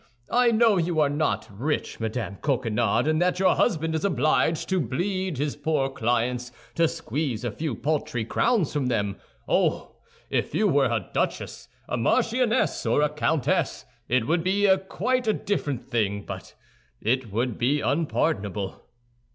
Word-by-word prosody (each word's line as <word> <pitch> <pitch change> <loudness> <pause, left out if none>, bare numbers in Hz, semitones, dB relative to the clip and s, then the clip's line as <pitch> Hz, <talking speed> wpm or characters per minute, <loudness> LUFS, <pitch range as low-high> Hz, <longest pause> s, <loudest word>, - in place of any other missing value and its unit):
I 245 0 +4
know 225 -2 +4
you 170 -2 0
are 145 -2 +3
not 145 -8 0
rich, 135 +10 -2
Madame 110 -3 -3
Coquenard, 120 -4 +1
and 155 +1 +2
that 180 0 +2
your 190 0 +4
husband 160 -7 +1
is 160 - -1
obliged 165 -4 +1
to 190 -1 +2
bleed 180 - -2
his 145 +1 -1
poor 145 -2 0
clients 125 0 -1 0.2
to 165 +3 +3
squeeze 130 -5 -3
a 120 - -1
few 150 +3 -3
paltry 125 -3 -1
crowns 220 - +1
from 145 -4 0
them. 100 -5 -1 0.3
Oh! - - 0 0.3
If - - -1
you - - +3
were - - +3
a - - -2
duchess, - - -2 0.2
a - - -2
marchioness, 235 - +1
or 120 +5 +2
a 150 - +3
countess, 150 -1 0 0.2
it 125 -2 +2
would 165 +5 +1
be 200 +3 +2 0.2
quite 255 -2 0
a 215 - +4
different 145 - -2
thing; 100 -5 -1 0.7
it 120 0 0
would 120 +2 -1
be 140 +5 +2
unpardonable." 105 - -1
145 Hz, 150 wpm, -25 LUFS, 120-170 Hz, 0.7 s, I